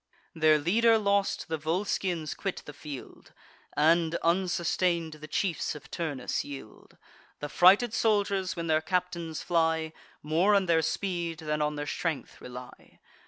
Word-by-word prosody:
Their 155 -1 +4
leader 225 +9 +4
lost, 200 -2 0
the 160 -2 -3
Volscians 170 0 -1
quit 195 -2 -4
the 145 - -9
field, 145 -2 -10 0.4
And, 165 +2 +3
unsustain'd, 170 -1 +1
the 155 - -8
chiefs 170 0 -1
of 150 - -12
Turnus 145 -7 -2
yield. 135 -6 -11 0.4
The 145 - -5
frighted 200 - +5
soldiers, 200 -4 +1
when 170 - -4
their 155 -1 +2
captains 175 -3 -2
fly, 160 -2 +1 0.3
More 170 +7 +3
on 195 -1 +3
their 165 -2 +3
speed 170 -1 -2
than 150 -1 -2
on 150 0 0
their 145 0 -4
strength 160 0 -4
rely. 125 0 -11
165 Hz, 140 wpm, -29 LUFS, 155-185 Hz, 0.4 s, frighted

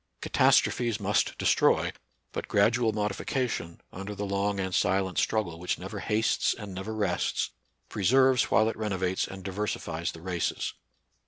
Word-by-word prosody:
Ca - - -6
tastrophes 120 -3 +3
must 100 0 +1
destroy; - - +3 0.4
but - - -5
gradual 110 +3 +3
modifica 105 +5 -1
tion, 85 -7 -5
under 100 +3 -6
the 105 - -3
long 100 0 -1
and 95 -1 -2
silent 95 -1 +1
struggle 90 -7 0
which 90 - -1
never 95 +3 -6
hastes 110 +2 +1
and 105 -3 -8
never 95 +4 -5
rests, 100 -5 0 0.4
preserves 130 +5 +4
while 110 +2 +3
it 110 - -1
renovates 95 -4 -1
and 95 0 -9
diversifies 90 -4 -3
the 80 - -11
races. 90 -2 -2
100 Hz, 150 wpm, -28 LUFS, 95-110 Hz, 0.4 s, preserves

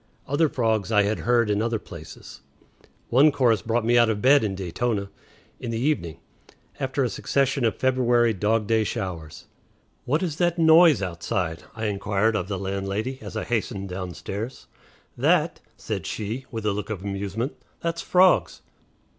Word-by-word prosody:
Other 145 +3 +2
frogs 110 -5 0
I 105 -2 +4
had 105 +2 -1
heard 120 -1 +2
in 105 0 +1
other 115 0 0
places. - - -11 0.7
One 140 +6 +5
chorus 120 -7 +2
brought 115 0 -1
me 120 +1 +4
out 120 -1 +4
of 105 -2 -1
bed 135 +3 +5
in 100 -3 -1
Daytona 100 +3 -2 0.5
in 120 - -5
the 115 - -2
evening 125 - -1 0.6
after 135 +1 -1
a - - +2
succession 135 +4 0
of 115 - +1
February 120 -3 +2
dog 105 +2 +1
day 110 +1 +2
showers. 85 -6 -5 0.6
"What 150 +8 +1
is 160 -4 -3
that 175 -1 +1
noise 160 - +6
outside?" 85 -2 -3
I 110 0 -4
inquired 105 +1 0
of 95 -4 -2
the 100 -1 -3
landlady 100 +6 -3
as - - -7
I - - -2
hastened 100 -4 -2
downstairs. 95 +6 -6 0.5
"That?" - - +2 0.2
said - - -4
she, 110 +5 -4
with 110 -3 -5
a 105 - +2
look 105 +1 -5
of 100 -4 -5
amusement; 100 - -3 0.3
"that's 170 0 -2
frogs." 185 0 +3
110 Hz, 165 wpm, -24 LUFS, 100-130 Hz, 0.7 s, noise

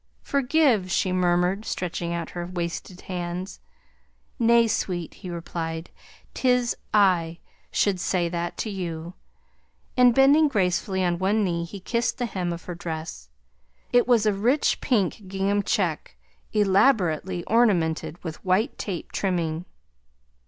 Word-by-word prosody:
"Forgive," 275 -7 +2
she 185 +1 +1
mermered, 180 +2 +1
stretching 175 -4 -3
out 170 -1 -4
her 175 -1 -5
waisted 175 +1 -5
hands. 180 +1 -5 0.8
"Nay, 235 0 +5
sweet," 180 -6 -2
he 185 - -9
replied. 165 -1 -5 0.4
"'Tis 250 -2 +2 0.2
I 180 -5 +3 0.3
should 195 -3 +1
say 180 -2 0
that 170 0 -3
to 215 - -4
you," 170 -3 -5 0.8
and 250 -2 +5
bending 285 +3 +6
gracefully 190 -5 0
on 175 -1 0
one 205 +3 +2
knee 170 -3 -1
he 195 +4 -9
kissed 235 +5 -1
the 245 - -1
hem 185 -5 -3
of 170 0 -6
her 180 - -5
dress. 160 - -6 0.6
It 245 0 +4
was 235 -4 +4
a 210 - +3
rich 240 +9 +1
pink 210 -5 0
gingham 195 +2 0
check, 185 -6 -1 0.3
ellaborately 190 - +2
ornamented 175 -8 +1
with 160 -3 -7
white 195 +8 +1
tape 185 -5 -5
trimming. 170 -3 -1
185 Hz, 130 wpm, -25 LUFS, 175-215 Hz, 0.8 s, bending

